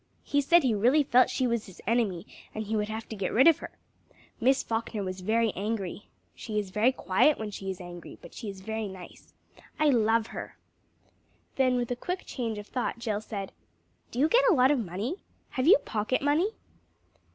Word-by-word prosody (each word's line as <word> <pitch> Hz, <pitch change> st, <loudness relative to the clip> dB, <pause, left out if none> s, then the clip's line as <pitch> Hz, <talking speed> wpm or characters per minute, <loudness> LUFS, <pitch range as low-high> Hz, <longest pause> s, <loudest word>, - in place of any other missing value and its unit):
He 285 Hz, 0 st, +1 dB
said 340 Hz, +5 st, +5 dB
he 250 Hz, -4 st, +2 dB
really 250 Hz, +9 st, +4 dB
felt 255 Hz, -2 st, +4 dB
she 260 Hz, -, 0 dB
was 235 Hz, -3 st, -1 dB
his 190 Hz, -, -14 dB
enemy, 210 Hz, -6 st, 0 dB, 0.3 s
and 215 Hz, -, -2 dB
he 220 Hz, +2 st, -2 dB
would 210 Hz, 0 st, -1 dB
have 220 Hz, +1 st, -5 dB
to 220 Hz, -, -5 dB
get 195 Hz, -3 st, -2 dB
rid 260 Hz, +6 st, +5 dB
of 330 Hz, -, +6 dB
her! -, -, -7 dB, 0.7 s
Miss 260 Hz, +3 st, +3 dB
Falkner 225 Hz, -2 st, -3 dB
was 185 Hz, 0 st, -5 dB
very 225 Hz, +3 st, +2 dB
angry. 205 Hz, -1 st, -4 dB, 0.3 s
She 215 Hz, -2 st, -5 dB
is 205 Hz, -3 st, -2 dB
very 215 Hz, +5 st, +3 dB
quiet 265 Hz, +5 st, +2 dB
when 215 Hz, -1 st, -5 dB
she 195 Hz, -1 st, -6 dB
is 190 Hz, -, -4 dB
angry, 175 Hz, -1 st, -10 dB
but -, -, -13 dB
she's 200 Hz, -5 st, -7 dB
very 220 Hz, +1 st, -3 dB
nice. 190 Hz, -2 st, -12 dB, 0.4 s
I 305 Hz, -1 st, +4 dB
love 225 Hz, -2 st, +3 dB
her!" -, -, -7 dB, 1.0 s
Then 255 Hz, -2 st, +3 dB
with 245 Hz, -1 st, -1 dB
a -, -, 0 dB
quick 360 Hz, +9 st, -4 dB
change 230 Hz, -4 st, -3 dB
of 205 Hz, -, -7 dB
thought, 245 Hz, +1 st, -3 dB
Jill 215 Hz, -3 st, -2 dB
said 200 Hz, -3 st, -6 dB, 0.6 s
"Do -, -, -9 dB
you 285 Hz, +4 st, +4 dB
get -, -, +4 dB
a 385 Hz, -, +5 dB
lot 260 Hz, +1 st, +5 dB
of 290 Hz, -, +2 dB
money? 215 Hz, -, -3 dB, 0.3 s
Have 255 Hz, +2 st, -1 dB
you 410 Hz, +7 st, +9 dB
pocket 220 Hz, -, -2 dB
money?" 300 Hz, +8 st, +2 dB
225 Hz, 200 wpm, -28 LUFS, 205-260 Hz, 1.0 s, you